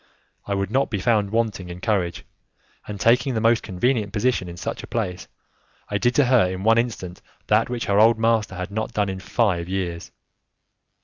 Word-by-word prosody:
I 100 - -1
would 100 0 -2
not 135 +3 +1
be 105 - -2
found 105 0 +1
wanting 110 -5 -1
in 85 0 -8
courage, 90 -4 -1 0.6
and 105 -1 -6
taking 125 +4 +3
the - - +1
most 115 +1 +3
convenient 105 +2 -1
position 110 -4 0
in 85 - -9
such - - -4
a - - -10
place, 95 -6 -3 0.6
I 105 - -1
did 120 +4 +1
to 145 - +4
her 120 -7 +4
in 95 +1 -5
one 115 +1 +4
instant 105 -7 -4 0.2
that 105 +2 +2
which 120 -1 -3
her 100 0 +2
old 110 +1 +6
master 110 -3 +1
had 90 +2 -5
not 110 +2 -3
done 105 -2 0
in 95 0 -4
five 95 -3 0
years. 90 -3 -4
105 Hz, 195 wpm, -23 LUFS, 95-115 Hz, 0.6 s, old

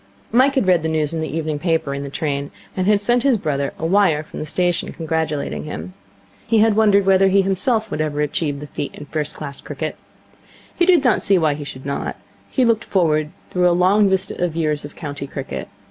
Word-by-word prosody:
Mike 260 +4 +4
had 265 - +2
read 180 -2 +4
the 160 - -1
news 155 -1 0
in 160 - -2
the 160 - -2
evening 155 -2 -3
paper 160 -3 0
in 140 - -4
the 140 - -5
train, 140 -1 -2 0.3
and 185 0 -1
had 210 -1 +4
sent 240 +4 +2
his 270 -3 +3
brother 140 -6 -1
a 160 - -4
wire 170 -4 +3
from - - -9
the 155 - -5
station, 175 +1 0
congratulating 160 -3 -2
him. 170 +4 -6 0.5
He 225 0 +3
had 220 0 +4
wondered 205 -2 +4
whether 195 0 +5
he 195 +1 +4
himself 215 +3 0
would 155 - -1
ever 150 -1 -2
achieve 150 -1 -1
the - - -6
feat 145 -1 -5
in - - -9
first 150 0 -3
class 140 -2 -7
cricket. - - -5 0.8
He 345 - +2
did 350 -6 +5
not 250 -4 +3
see 195 - +4
why 155 -4 +2
he 145 +1 -6
should 135 -2 -9
not. 140 0 -3 0.3
He 260 - +2
looked 230 -2 +2
forward 155 -5 +1 0.2
through 180 -1 +3
a 175 - +2
long 195 +3 +4
vista 190 -1 0
of 170 -3 -1
years 155 -3 0
of 145 - -9
county 145 -2 -6
cricket. 135 -1 -6
165 Hz, 225 wpm, -20 LUFS, 150-200 Hz, 0.8 s, whether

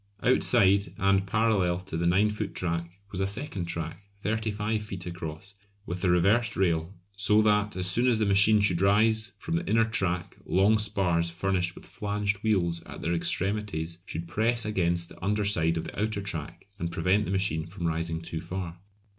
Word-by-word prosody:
Outside 100 -6 +4
and 95 0 +2
parallel 100 -4 +2
to 95 -3 -7
the 85 +1 0
9 100 +5 +3
foot 105 -1 -5
track 85 -1 -2 0.2
was 95 - -2
a 95 - +1
second 100 -3 -3
track, 85 +1 -4 0.2
35 110 0 -1
feet 95 -4 -7
across, 85 +2 -6 0.3
with 90 +1 -5
a 90 - +3
reversed 105 +6 +3
rail, 85 -2 +1 0.2
so 105 +2 +3
that 105 0 +2
as 90 -1 -1
soon 115 +8 +2
as 120 -3 +3
the 110 - +1
machine 105 +2 +5
should 90 -4 +2
rise 110 +3 +3
from 165 - -2
the 170 - -4
inner 115 +1 +4
track 95 -5 -1
long 100 +4 +3
spars 95 -5 +1
furnished 90 +1 -1
with - - -12
flanged 105 0 -2
wheels 90 -6 +1
at - - -9
their 85 - 0
extremities 85 -2 -1
should 85 +1 -5
press 115 +6 0
against 85 -5 0
the - - -14
under 105 +1 0
side 85 -5 +2
of 80 - -2
the - - -7
outer 110 -1 -1
track 85 -7 -5
and 85 -2 -3
prevent 95 +5 +1
the 90 - -3
machine 95 -5 0
from 85 0 -6
rising 80 0 -2
too 80 -1 -5
far. 90 -2 -6
95 Hz, 185 wpm, -27 LUFS, 85-105 Hz, 0.3 s, machine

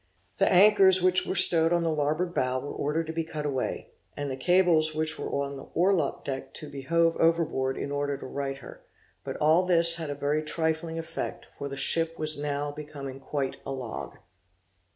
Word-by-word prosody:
The - - +3
anchors 190 0 +6
which 185 0 +3
were - - -2
stowed 165 -2 +8
on 170 -1 +1
the 165 - 0
larboard 155 +4 -1
bow 130 -3 -1
were 145 - -7
ordered 155 +3 -2
to 160 - -6
be 165 0 -2
cut 155 -2 -6
away, 135 -3 -4 0.3
and 145 -1 -4
the - - -3
cables 165 0 +2
which 155 0 -1
were - - -4
on 140 0 -3
the 135 - -11
orlop 175 -4 +1
deck 135 -1 -6
to 155 - -7
be 140 -1 -7
hove 165 +4 +1
overboard 165 -5 0
in 140 - -5
order 145 0 -2
to - - -10
right 135 0 -5
her; 135 - -13 0.4
but - - -6
all 155 +4 +3
this 170 -2 +5
had 160 -3 -5
a 145 - -4
very 145 +2 -1
trifling 160 +1 -2
effect, 165 0 -6
for 140 - -6
the 140 - -7
ship 165 +3 +1
was 155 0 -1
now 145 0 -3
become 145 -3 -9
quite 135 0 -4
a - - -6
log. 130 -4 -7
155 Hz, 200 wpm, -27 LUFS, 140-165 Hz, 0.4 s, stowed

